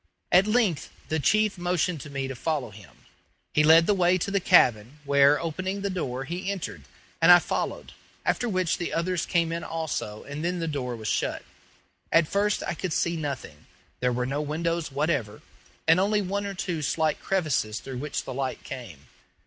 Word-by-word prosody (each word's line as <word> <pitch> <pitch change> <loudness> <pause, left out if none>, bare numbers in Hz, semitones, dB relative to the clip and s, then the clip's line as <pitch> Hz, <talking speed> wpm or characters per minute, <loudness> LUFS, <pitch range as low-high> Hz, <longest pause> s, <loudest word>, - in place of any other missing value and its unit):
At 185 +3 +6
length 215 -8 +1 0.2
the 160 - 0
chief 210 +6 +2
motioned 175 -2 0
to 150 - -9
me 135 -1 -3
to 135 - -5
follow 140 -3 -2
him. 105 -1 -16 0.5
He 150 - +4
led 160 +2 +7
the 205 - +3
way 180 -1 +3
to 190 +2 -3
the 200 - +2
cabin, 125 - +4
where, 140 +1 +5
opening 185 +4 -3
the 200 0 -2
door, 135 -8 -3
he 175 +7 -4
entered, 130 - -5 0.4
and 165 +2 +8
I 175 - +11
followed, - - -3 0.3
after 245 - +1
which 185 -4 0
the 175 - -3
others 170 0 -1
came 170 -2 +1
in 170 0 -3
also 155 -10 -4
and 145 +3 -6
then 180 +1 -1
the 165 -1 -2
door 130 -5 -3
was 110 -2 -7
shut. - - -1 0.7
At 165 -2 +4
first 205 +3 0
I - - -2
could 175 0 -3
see 170 +1 0
nothing. 140 - -6 0.3
There 125 0 +1
were 125 0 -1
no 140 +3 -2
windows 165 +1 -2
whatever, 135 -7 -1 0.4
and 165 +2 +6
only 205 +2 +2
one 200 +2 -2
or 200 - -5
two 175 -4 -3
slight 155 +2 0
crevices 150 - 0
through 130 -2 -7
which 145 +1 -3
the - - -6
light 130 0 -3
came. 105 - -9
160 Hz, 190 wpm, -26 LUFS, 135-180 Hz, 0.7 s, I